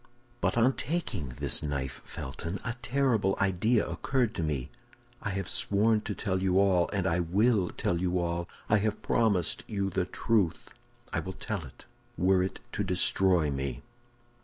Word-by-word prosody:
"But - - +1
on 125 +3 +4
taking 105 - -3
this - - +3
knife, 70 -3 -3
Felton, 85 +8 -5
a 115 - -1
terrible 120 -6 +1
idea 100 +4 +2
occurred 125 -4 0
to 95 - -3
me. 75 -6 -2 0.5
I 105 - -2
have 95 -2 -3
sworn 105 +3 +2
to 105 -2 -4
tell 95 -1 -1
you 95 -1 +2
all, 95 -3 +3
and 100 -2 -1
I 85 -2 +2
will 95 +3 +2
tell 85 0 -1
you 90 0 +1
all. 85 0 -2 0.2
I 105 - +4
have 105 +1 -1
promised 100 -8 +1
you 100 -2 -1
the 90 0 0
truth; 95 -3 0 0.4
I - - +1
will 95 - -5
tell 100 -7 -4
it, 65 - -14 0.3
were 95 +1 +4
it 95 - -3
to - - -1
destroy 90 -3 +3
me." 65 -2 -3
95 Hz, 165 wpm, -29 LUFS, 85-110 Hz, 0.5 s, on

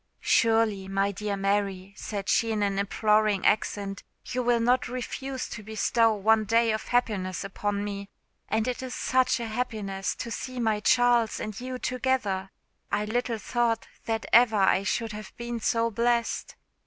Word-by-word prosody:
"Surely, 225 -4 +3
my 195 +1 +1
dear 200 +1 -3
Mary," 195 -1 -1
said 200 -1 -5
she 225 -1 +2
in 210 -2 0
an 200 -1 0
imploring 210 0 +2
accent, 200 -2 0 0.2
"you 255 - -2
will 240 -1 +2
not 245 +2 +2
refuse 255 +2 -4
to 210 - -7
bestow 220 +2 +2
one 220 +1 +3
day 230 +2 +3
of 215 - -3
happiness 205 -7 0
upon 200 +1 -2
me? 200 -1 -5 0.4
and 220 +2 +1
it 250 0 -2
is 260 -1 -5
_such 255 -1 +2
_a 235 - -3
happiness 215 -5 -3
to 230 - -6
see 255 +2 -5
my 220 -3 +1
Charles 240 0 +3
and 215 +1 -5
you 255 0 -4
together. 250 -7 -1 0.4
I 210 +1 0
little 235 +1 -1
thought 230 +1 0 0.2
that 225 0 -2
ever 235 -1 +6
I 190 -1 +4
should 225 +2 -1
have 210 -1 -9
been 235 0 -4
so 230 +1 +1
blessed. 235 +1 0
220 Hz, 165 wpm, -27 LUFS, 200-240 Hz, 0.4 s, ever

